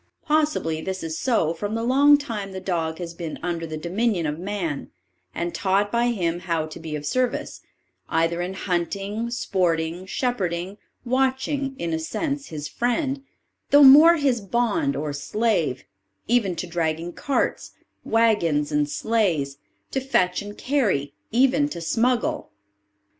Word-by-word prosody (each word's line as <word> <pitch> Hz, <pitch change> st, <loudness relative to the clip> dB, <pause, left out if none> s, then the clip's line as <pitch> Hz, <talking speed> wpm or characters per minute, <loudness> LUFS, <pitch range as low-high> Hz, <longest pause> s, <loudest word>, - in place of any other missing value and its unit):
Possibly 300 Hz, -, +1 dB
this 190 Hz, +1 st, -4 dB
is 160 Hz, -1 st, -4 dB
so 220 Hz, -11 st, +1 dB
from 205 Hz, +6 st, -4 dB
the 225 Hz, -, -2 dB
long 280 Hz, +4 st, +6 dB
time 215 Hz, -9 st, -5 dB
the 190 Hz, -, -4 dB
dog 165 Hz, -4 st, -2 dB
has 170 Hz, -2 st, -6 dB
been 170 Hz, -2 st, -6 dB
under 170 Hz, -2 st, -2 dB
the 155 Hz, 0 st, -5 dB
dominion 180 Hz, +2 st, 0 dB
of 150 Hz, +1 st, -2 dB
man, 180 Hz, -6 st, -3 dB, 0.5 s
and 170 Hz, 0 st, -2 dB
taught 200 Hz, +1 st, +1 dB
by 235 Hz, +1 st, +2 dB
him 175 Hz, -8 st, 0 dB
how 165 Hz, -3 st, -1 dB
to 155 Hz, +1 st, -9 dB
be 160 Hz, -2 st, -5 dB
of 150 Hz, -1 st, -5 dB
service, 250 Hz, -, -1 dB, 0.5 s
either 165 Hz, +1 st, +1 dB
in 185 Hz, +2 st, -4 dB
hunting, 200 Hz, +5 st, -2 dB
sporting, 175 Hz, -6 st, -1 dB
shepherding, 190 Hz, -5 st, -2 dB, 0.3 s
watching; 265 Hz, +2 st, 0 dB
in 170 Hz, -1 st, -3 dB
a 160 Hz, -, 0 dB
sense 280 Hz, -, -3 dB
his 150 Hz, -2 st, -5 dB
friend, 270 Hz, -, -1 dB, 0.5 s
though 285 Hz, 0 st, +7 dB
more 300 Hz, +5 st, +9 dB
his 270 Hz, -7 st, +1 dB
bond 245 Hz, -, 0 dB
or 150 Hz, -1 st, -3 dB
slave, 160 Hz, -, 0 dB, 0.4 s
even 220 Hz, -6 st, +2 dB
to 170 Hz, -, -4 dB
dragging 170 Hz, 0 st, -2 dB
carts, 280 Hz, -, -1 dB, 0.3 s
waggons, 170 Hz, -11 st, +2 dB
and 150 Hz, 0 st, +1 dB
sleighs, 170 Hz, -11 st, 0 dB, 0.3 s
to 270 Hz, -, 0 dB
fetch 185 Hz, -10 st, +1 dB
and 205 Hz, 0 st, -9 dB
carry, 205 Hz, -, 0 dB, 0.2 s
even 270 Hz, +5 st, +3 dB
to 170 Hz, -, -6 dB
smuggle. 245 Hz, -, 0 dB
195 Hz, 145 wpm, -24 LUFS, 165-245 Hz, 0.5 s, more